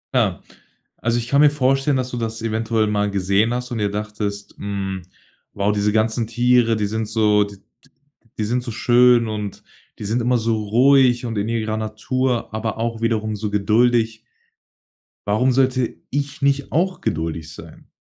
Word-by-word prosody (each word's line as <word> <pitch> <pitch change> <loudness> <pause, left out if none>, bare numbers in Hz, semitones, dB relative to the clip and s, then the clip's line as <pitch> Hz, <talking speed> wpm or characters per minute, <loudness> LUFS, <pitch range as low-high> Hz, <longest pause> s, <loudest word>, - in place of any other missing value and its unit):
Ah, - - +1 0.5
also 115 0 0
ich 120 0 -2
kann 140 +3 +3
mir 150 - +7
vorstellen, 135 0 +1
dass 130 -1 -2
du 125 - -4
das 115 -1 -3
eventuell 110 0 0
mal 105 -1 0
gesehen 100 +3 +1
hast 125 0 -4
und 120 - -3
dir 105 -1 0
dachtest: 105 0 -4
„Hm, 95 -2 -4 0.5
wow, 100 +1 +1
diese 105 0 +1
ganzen 110 +1 0
Tiere, 120 0 +3
die 105 -1 -1
sind 110 +1 -2
so 105 -1 +3
d 100 0 -8
d 95 - -30 0.7
die 110 - -1
sind 120 +4 0
so 120 - -5
schön 120 +1 +4
und 105 -2 -5 0.4
die - - -6
sind 115 +4 0
immer 125 +1 +2
so 115 0 0
ruhig 125 +2 +4
und 115 -1 -4
in 105 +2 -2
ihrer 110 -1 -1
Natur, 115 +3 -2
aber 110 0 -3
auch 115 0 -3
wiederum 110 -2 0
so 105 0 -3
geduldig.“ 110 +2 +2 1.1
Warum 125 +6 +2
sollte 130 -2 +1
ich 140 +1 -3
nicht 140 0 0
auch 180 +4 +1
geduldig 80 -1 -3
sein? - - -13
115 Hz, 175 wpm, -21 LUFS, 105-125 Hz, 1.1 s, mir